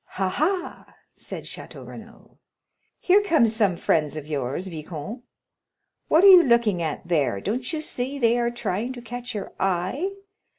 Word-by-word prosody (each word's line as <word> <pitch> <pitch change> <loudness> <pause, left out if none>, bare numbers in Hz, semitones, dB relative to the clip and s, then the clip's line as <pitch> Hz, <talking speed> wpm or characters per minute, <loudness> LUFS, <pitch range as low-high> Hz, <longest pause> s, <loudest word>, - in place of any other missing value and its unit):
"Ha, 190 -1 +1
ha," 355 - -2 0.2
said - - -7
Château - - -9
Renaud, - - -13 0.6
"here 385 +3 +4
come 320 - +3
some 215 -5 +1
friends 155 -2 0
of 150 - -6
yours, 145 +3 -3
viscount! 165 - -7 0.9
What 325 +4 +4
are - - +9
you 370 -2 +10
looking 235 - +2
at 160 +1 -4
there? 140 - +1
don't 245 - -3
you 315 -2 -3
see 270 -2 -3
they 240 -2 +3
are 235 0 +1
trying 240 0 -3
to 245 - -9
catch 245 0 -6
your 200 -2 -5
eye?" 190 - 0
225 Hz, 160 wpm, -24 LUFS, 175-260 Hz, 0.9 s, you